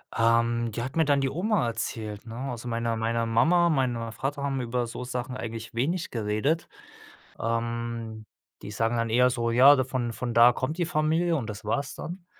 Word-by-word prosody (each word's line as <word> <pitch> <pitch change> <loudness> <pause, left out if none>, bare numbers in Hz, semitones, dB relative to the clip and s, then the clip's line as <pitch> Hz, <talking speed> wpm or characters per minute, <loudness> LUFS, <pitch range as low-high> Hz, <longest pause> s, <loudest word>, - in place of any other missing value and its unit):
Ähm, 115 0 +2
die 115 - -4
hat 130 +3 -6
mir 160 - +4
dann 140 -1 +3
die 135 - +1
Oma 180 - 0
erzählt, 110 -2 -4
ne? 115 0 -8 0.2
Also, 120 0 -7
meine 115 0 -1
meine 115 +1 0
Mama, 165 +10 +3
meine 120 -6 0
Vater 135 +4 -3
haben 135 -2 -1
über 120 0 -2
so 125 +2 -6
Sachen 125 +1 -4
eigentlich 115 -2 -6
wenig 160 +9 -1
geredet. 115 +8 -1 0.7
Ähm, 115 -1 -3 0.4
die - - -7
sagen 115 +3 0
dann 115 0 0
eher 125 +3 +4
so: 115 -1 -1
„Ja 130 +3 +7
von 125 -2 -2
von 120 +1 -4
da 120 +1 +7
kommt 130 +6 -3
die 175 - +2
Familie“ 160 +1 +1
und 120 -5 -4
das 105 0 -7
war's 135 +6 -2
dann. 175 +1 -8
120 Hz, 190 wpm, -27 LUFS, 115-140 Hz, 0.7 s, Ja